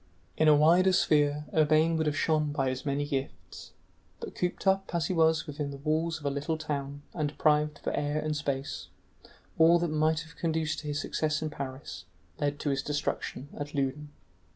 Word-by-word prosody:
In 155 - +3
a 150 - +8
wider 175 +5 +5
sphere 150 -3 +2
Urbain 155 +1 +4
would 160 -1 0
have 150 - 0
shone 155 -2 +1
by 135 -3 0
his 130 +3 -4
many 140 +1 0
gifts, 135 -2 -5 0.5
but, - - -7
cooped 180 +2 -3
up 195 -2 +1
as 165 -3 +1
he 185 - -1
was 160 -1 +3
within 145 -1 -4
the 140 - -7
walls 160 +3 0
of 145 - -12
a 140 - +1
little 145 +3 -2
town 145 -2 -4
and 155 -3 -1
deprived 150 0 +2
of - - -3
air 145 +1 -1
and 155 0 -2
space, 140 -2 -3 0.7
all 165 +1 +7
that 170 -1 -1
might 155 +1 +1
have 165 0 -13
conduced 160 -2 -1
to 150 - -8
his 145 0 -1
success 155 0 -1
in 155 - -3
Paris 130 -8 -7 0.3
led 145 0 -1
to 145 - 0
his 135 0 0
destruction 145 -1 -3
at 145 +1 -6
Loudun. 140 +2 -2
150 Hz, 195 wpm, -29 LUFS, 145-160 Hz, 0.7 s, a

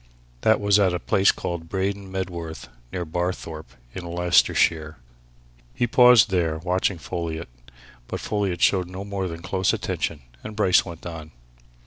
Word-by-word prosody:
That 110 - +4
was 100 0 +4
at 95 -3 +3
a - - -2
place 95 +3 +3
called 85 -1 -5
Braden 100 +1 -2
Medworth, 85 -4 -5 0.2
near 90 -2 -3
Barthorpe, 85 -1 -4 0.2
in 90 - -6
Leicestershire." 85 -2 +2 0.8
He 120 - +1
paused 125 -2 +6
there, 85 -4 +1
watching 90 +2 0
Folliot. 85 -2 -5 0.6
But - - -4
Folliot 100 -5 -2
showed 95 -3 +3
no 95 +2 -7
more 100 -2 -3
than 85 -1 -7
close 95 +1 +1
attention, 75 -4 -3 0.2
and 110 - -7
Bryce 95 -4 +4
went 85 -3 -10
on. 80 -2 -7
90 Hz, 145 wpm, -24 LUFS, 85-100 Hz, 0.8 s, paused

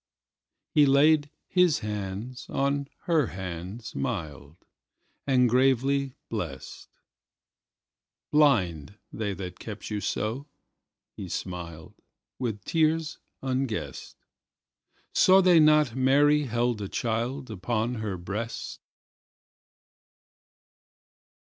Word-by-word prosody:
He 150 -1 +6
laid 145 +2 +4 0.2
his 180 -6 +3
hands 105 +4 -5
on 140 0 0 0.2
her 160 -7 +2
hands 95 +4 -7
mild, 80 - -4 0.7
And 125 -2 +4
gravely 135 +2 +2
blessed;"Blind, 90 - -3 0.2
they 105 -3 -3
that 90 -2 -7
kept 110 0 -7
you 105 - -1
so," 115 +10 -2 0.7
he 95 - -7
smiled, 85 -3 -6 0.5
With 110 -6 -3
tears 160 -1 +1 0.2
unguessed."Saw 130 - -1
they 180 -3 +6
not 150 -5 +4
Mary 145 +3 +4
held 120 -2 0
a 100 - -4
childUpon 115 -1 -2
her 105 -4 -3
breast?" 100 +6 -5
120 Hz, 80 wpm, -27 LUFS, 100-140 Hz, 0.7 s, He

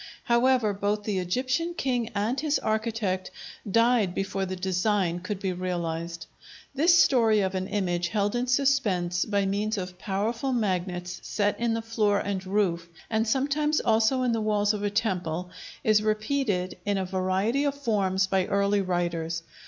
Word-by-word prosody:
However, 240 -3 +3
both 205 +1 -1
the 205 -3 -1
Egyptian 255 - -1
king 245 -6 -1
and 220 +6 0
his 300 0 +1
architect 215 -4 -1 0.4
died 230 -3 +3
before 195 0 -2
the 185 - -4
design 185 -1 0
could 185 +2 -5
be 190 -2 -2
realized. 170 -2 -3 0.5
This 335 +5 +5
story 225 -9 +4
of 190 -1 -1
an 185 0 -2
image 175 -4 -1
held 205 +3 0
in 245 +1 -1
suspense 220 -10 +1
by 200 -2 0
means 205 +3 -1
of 180 -1 -6
powerful 225 +7 -1
magnets 180 -5 -2
set 205 -1 -1
in 230 -1 +1
the 225 - -3
floor 215 -3 +1
and 200 -2 -2
roof, 180 -4 0 0.2
and 220 0 +1
sometimes 290 +5 +1
also 230 +3 +2
in 250 - +2
the 225 -1 0
walls 210 -1 +2
of 210 - -4
a 205 - 0
temple, 180 -5 -2 0.3
is 215 -1 +4
repeated 215 -4 -1
in 205 0 0
a 190 - -1
variety 190 +8 0
of 285 -1 0
forms 200 -8 +1
by 190 -1 0
early 200 0 +2
writers. 170 -2 -2
205 Hz, 160 wpm, -27 LUFS, 185-230 Hz, 0.5 s, This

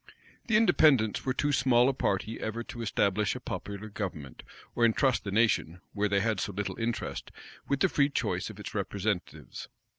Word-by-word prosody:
The 220 -3 +4
Independents 150 - +4
were 130 - +2
too 145 +1 +1
small 125 -2 +4
a 135 - +2
party 110 -2 -1
ever 110 +2 -3
to 120 - -8
establish 105 -1 +1
a - - -5
popular 100 +1 -6
government, 90 - -6 0.3
or 120 - 0
intrust 115 +2 +3
the - - -3
nation, 100 -6 +1
where 105 0 0
they 100 0 +2
had 110 -2 0
so 100 - -2
little 105 +4 -4
interest, 115 0 -3 0.4
with 140 -1 0
the - - +5
free 140 -1 +2
choice 140 - -2
of - - -11
its - - -7
representatives. 100 -2 -3
110 Hz, 180 wpm, -29 LUFS, 100-130 Hz, 0.4 s, the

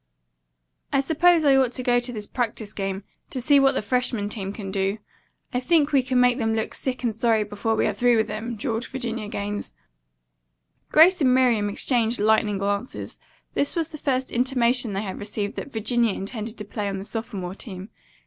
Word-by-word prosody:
"I 275 - +3
suppose 320 +4 +3
I 275 -1 +6
ought 260 -2 +3
to 255 - -3
go 245 0 +3
to 245 +1 -3
this 215 -3 -4
practice 220 -3 -3
game, 195 0 -3 0.3
to 260 - -4
see 280 +3 +4
what 275 0 +4
the - - -1
freshmen 230 -2 0
team 195 -3 -3
can 200 -2 -6
do. 195 +1 0 0.6
I 250 - +1
think 300 +3 +2
we 275 -2 +4
can 255 0 0
make 250 +1 +4
them 225 -1 0
look 220 - -2
sick 255 -1 -4
and 230 -3 0
sorry 225 -1 +2
before 210 +2 -2
we - - +1
are - - +1
through 245 -1 +3
with 220 - +1
them," 220 +3 -4
drawled 230 +1 -3
Virginia 235 -4 -4
Gaines. 205 0 -4 1.2
Grace 335 +3 +6
and 255 -2 +4
Miriam 235 -5 +3
exchanged 235 +2 +1
lightning 215 -1 +2
glances. 200 +5 -3 0.3
This 285 - 0
was 330 -2 0
the 305 - -9
first 260 -2 -1
intimation 245 -2 +2
they 195 +2 -2
had 190 -3 -5
received 205 0 -3
that 280 - -6
Virginia 230 -1 +1
intended 215 +3 -5
to 210 - -6
play 205 0 -4
on 195 - -3
the 195 - -6
sophomore 205 -5 -5
team. 195 -1 -9
230 Hz, 195 wpm, -24 LUFS, 205-255 Hz, 1.2 s, I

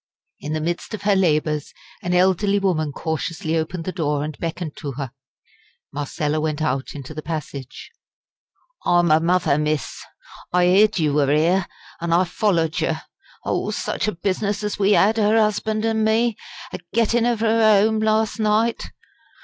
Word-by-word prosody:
In 150 +2 -5
the 155 - -1
midst 175 +6 -3
of - - -10
her 205 -1 +3
labours, 155 -5 0 0.3
an 180 0 -1
elderly 190 +2 +3
woman 170 -7 0
cautiously 160 +2 -3
opened 165 +2 -2
the 185 - -2
door 150 -5 -1
and 155 0 -5
beckoned 165 -2 -4
to 145 -3 -5
her. 135 -1 -5 0.8
Marcella 150 +1 -2
went 155 -1 -2
out 135 -3 -2
into 140 +1 -8
the 155 - -6
passage. 145 -5 -6 0.9
"I'm 175 -2 +3
her 155 - +6
mother, 165 -3 +2
miss! 150 -1 -2 0.5
I 180 0 +3
'eered 205 +4 +4
you 155 -4 +1
were 145 -2 +2
'ere, 170 +5 +2 0.3
an' 170 0 0
I 175 +2 +4
follered 175 -3 0
yer. 160 0 0 0.5
Oh! - - -1
such - - -2
a 215 - 0
business 200 +3 -2
as 210 0 -3
we 205 +1 +4
'ad, 220 +3 +3
'er 215 +1 +3
'usband 215 0 +1
an' 220 -1 +1
me, 225 +1 +2 0.4
a - - -4 0.2
gettin' 230 +1 +2
of 235 -2 0
'er 225 0 +3 0.2
'ome 220 0 +1
last 220 +1 +1
night. 220 +2 +1
175 Hz, 165 wpm, -22 LUFS, 155-210 Hz, 0.9 s, her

